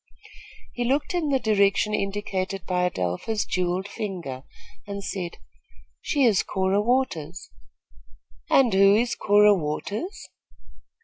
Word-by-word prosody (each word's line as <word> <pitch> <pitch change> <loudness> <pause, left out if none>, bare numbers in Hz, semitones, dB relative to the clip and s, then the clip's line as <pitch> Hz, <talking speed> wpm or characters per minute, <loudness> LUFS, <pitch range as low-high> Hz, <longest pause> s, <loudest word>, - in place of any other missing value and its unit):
He 245 - -2
looked 275 +8 0
in 340 -4 0
the 275 - +3
direction 210 -2 +2
indicated 195 -2 -3
by 180 -1 +1
Adelpha's 90 - -2
jewelled 185 +1 -1
finger, 175 -12 -5 0.5
and 200 0 -5
said: 180 -4 -5 0.6
"She 285 -3 0
is 220 -6 +4
Cora 190 +1 0
Waters." 210 - -1 1.0
"And 255 -6 +4
who 195 +1 +6
is 235 +2 +1
Cora 210 0 +5
Waters?" 200 - -4
200 Hz, 115 wpm, -25 LUFS, 185-225 Hz, 1.0 s, who